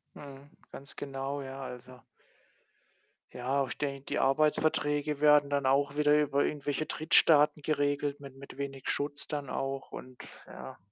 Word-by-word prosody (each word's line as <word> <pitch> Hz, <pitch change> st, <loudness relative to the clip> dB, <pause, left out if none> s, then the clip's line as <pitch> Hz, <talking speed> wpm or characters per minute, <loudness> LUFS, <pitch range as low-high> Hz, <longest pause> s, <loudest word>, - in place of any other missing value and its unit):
Mhm, 140 Hz, 0 st, -12 dB, 0.2 s
ganz 140 Hz, -, -10 dB
genau. 140 Hz, 0 st, -4 dB
Ja, 135 Hz, 0 st, -7 dB
also 125 Hz, -1 st, -9 dB, 1.3 s
ja, 135 Hz, +3 st, -1 dB
ich -, -, -7 dB
denke, 140 Hz, -2 st, -4 dB
die -, -, -3 dB
Arbeitsverträge 150 Hz, 0 st, +1 dB
werden 150 Hz, -1 st, +5 dB
dann 140 Hz, -2 st, +1 dB
auch 140 Hz, +1 st, +2 dB
wieder 150 Hz, 0 st, +4 dB
über 140 Hz, -1 st, +1 dB
irgendwelche 145 Hz, +1 st, -2 dB
Drittstaaten 150 Hz, -1 st, +4 dB
geregelt 145 Hz, -1 st, -1 dB
mit 135 Hz, -2 st, -11 dB
mit 140 Hz, 0 st, -12 dB
wenig 135 Hz, -1 st, -5 dB
Schutz 145 Hz, 0 st, -3 dB
dann 145 Hz, -3 st, -4 dB
auch 135 Hz, 0 st, -4 dB
und 130 Hz, -1 st, -10 dB, 0.3 s
ja. -, -, -10 dB
140 Hz, 145 wpm, -30 LUFS, 135-145 Hz, 1.3 s, werden